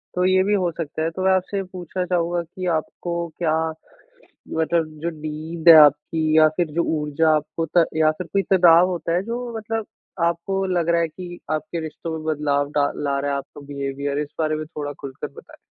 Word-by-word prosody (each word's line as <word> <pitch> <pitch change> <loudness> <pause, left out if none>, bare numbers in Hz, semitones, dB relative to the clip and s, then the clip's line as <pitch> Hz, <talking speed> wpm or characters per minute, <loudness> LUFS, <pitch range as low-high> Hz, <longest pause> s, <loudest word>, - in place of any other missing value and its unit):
तो 180 0 +2
ये 185 0 +4
भी 205 +2 +1
हो 185 -4 +1
सकता 155 -1 -3
है। 165 - +1
तो 185 - -6
मैं 190 - +5
आपसे 190 +2 0
पूछना 180 0 -5
चाहूँगा 175 -1 0
कि 180 +2 -8
आपको 170 +2 -4
क्या 160 -3 +1 1.0
मतलब 160 0 +1 0.2
जो 170 - -1
नींद 155 +2 -2
है 165 - +12
आपकी 155 +2 +1
या 155 0 +7
फिर 175 - +1
जो 170 - +2 0.2
ऊर्जा 150 +2 +1
आपको 155 +2 -3
त 170 - +7
या 155 -1 +4
फिर 180 - -5
कोई 195 - +2
तनाव 175 -2 +6
होता 170 -1 -2
है 180 - +1
जो 235 +1 -4
मतलब 225 0 -3 0.4
आपको 170 +3 -1
लग 175 -3 0
रहा 170 0 +3
है 165 - +1
कि, 175 +2 -9
आपके 155 +2 -2
रिश्तों 160 +1 -6
में 155 - -9
बदलाव 145 -1 0
डा 145 -1 +2
ला 140 -1 -1
रहा 145 +1 -2
है - - 0
आपका 140 - -10
बिहेवियर, 140 0 -3
इस 150 -1 -2
बारे 155 -1 +1
में 155 0 -5
थोड़ा 150 -2 -5
खुल 140 -1 -6
कर - - -2
बताएँ? - - -15
165 Hz, 210 wpm, -22 LUFS, 155-180 Hz, 1.0 s, है